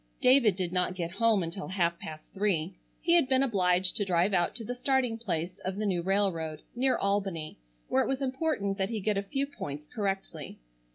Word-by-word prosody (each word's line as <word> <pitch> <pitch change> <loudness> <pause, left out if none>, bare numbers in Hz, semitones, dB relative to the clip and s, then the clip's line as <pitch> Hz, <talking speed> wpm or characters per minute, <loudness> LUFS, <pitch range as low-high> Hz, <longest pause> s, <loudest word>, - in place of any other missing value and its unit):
David 250 -6 +5
did 180 -2 -2
not 180 0 0
get 170 -2 -3
home 220 0 +3
until 170 +4 -5
half 170 -3 0
past 155 -1 -9
three. 190 -4 0 0.3
He 335 +1 +2
had 335 -7 +4
been 260 0 +4
obliged 185 -6 +2
to 205 - +1
drive 185 +1 +2
out 175 -2 +2
to 235 - -5
the 245 - -3
starting 250 -2 +1
place 180 -5 -3
of 185 0 -4
the 215 +1 -2
new 185 -4 +1
railroad, 170 -5 0
near 260 +1 +2
Albany, 195 - -2 0.3
where 130 - +2
it - - 0
was 270 -1 0
important 260 -8 -1
that 190 +1 +1
he 225 -2 -2
get 210 +1 0
a - - -1
few 270 +8 -1
points 150 - -7
correctly. 195 -8 -4
195 Hz, 205 wpm, -29 LUFS, 175-230 Hz, 0.3 s, David